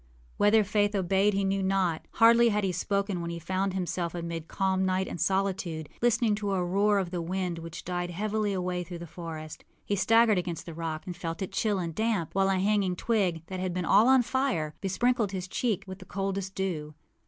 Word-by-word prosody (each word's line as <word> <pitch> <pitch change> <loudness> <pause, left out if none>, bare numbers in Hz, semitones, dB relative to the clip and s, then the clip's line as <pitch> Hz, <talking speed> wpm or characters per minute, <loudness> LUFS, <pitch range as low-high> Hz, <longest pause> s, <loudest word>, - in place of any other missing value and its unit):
â - - -31 0.3
Whether 210 +1 +5
Faith 205 0 +1
obeyed 195 +2 +2
he 200 - +1
knew 195 0 0
not. 190 -4 0
Hardly 235 +1 +6
had 210 -1 0
he 190 - +1
spoken 200 +1 -1
when 170 - -4
he 170 - -4
found 185 +3 -2
himself 175 -2 -2
amid 170 -1 -5
calm 190 -1 0
night 190 0 +1
and 170 - -5
solitude, 190 -5 -1
listening 230 -2 +3
to 205 -2 -2
a 185 -2 +1
roar 200 +3 +2
of 185 -3 -1
the 175 -2 -2
wind 180 0 -2
which 165 0 -8
died 175 0 -2
heavily 210 +3 -1
away 180 -2 -2
through 175 0 -7
the 170 - -7
forest. 160 -2 -8 0.2
He 205 - 0
staggered 225 0 +4
against 175 -2 -4
the 170 - -7
rock, 160 -1 -4
and 180 - -5
felt 165 0 -4
it 190 - -5
chill 205 +1 0
and 170 -3 -3
damp; 215 -4 -1
while 195 0 +2
a 195 - +2
hanging 195 -1 +1
twig, 185 -6 0
that 185 +2 -6
had 185 -1 -2
been 180 -1 -1
all 205 +7 +5
on 260 -1 +6
fire, 225 - -1
besprinkled 215 +2 +1
his 185 -1 -4
cheek 220 0 -1
with 190 0 -8
the 185 - -11
coldest 195 0 -3
dew. 155 -6 -3
190 Hz, 215 wpm, -28 LUFS, 175-205 Hz, 0.3 s, Hardly